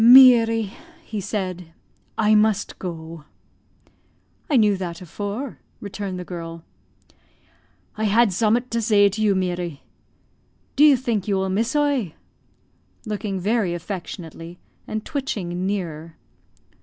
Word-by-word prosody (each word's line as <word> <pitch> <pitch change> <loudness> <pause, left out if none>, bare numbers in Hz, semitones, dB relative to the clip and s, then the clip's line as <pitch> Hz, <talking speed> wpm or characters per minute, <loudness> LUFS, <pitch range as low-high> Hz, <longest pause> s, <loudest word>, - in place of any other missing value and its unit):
"Meary," 230 -4 +7 0.3
he 215 -2 -5
said, 185 -4 -4 0.4
"I 215 -1 +4
must 210 -1 +2
go." 165 -3 -7 1.2
"I 285 - +4
knew 210 -3 +4
that 175 -3 -5
afore," 205 - -5 0.2
returned 200 -2 -5
the 180 - -6
girl. 165 -2 -7 1.3
"I 220 - -1
had 215 +1 +4
zummat 230 +6 +1
to 230 0 0
zay 205 -2 +5
to 210 +3 -4
you, 205 -2 +3
Meary. 175 -5 -2 0.9
Do 285 - +5
you 295 -3 +7
think 230 -6 -2
you 200 - +1
will 190 0 0
miss 225 +7 0
oie?" 280 - +1 0.9
(looking 210 -2 -3
very 200 -2 0
affectionately, 170 -2 -7 0.3
and 215 0 -4
twitching 190 - -3
nearer.) 165 -5 -4
200 Hz, 120 wpm, -23 LUFS, 180-225 Hz, 1.3 s, Meary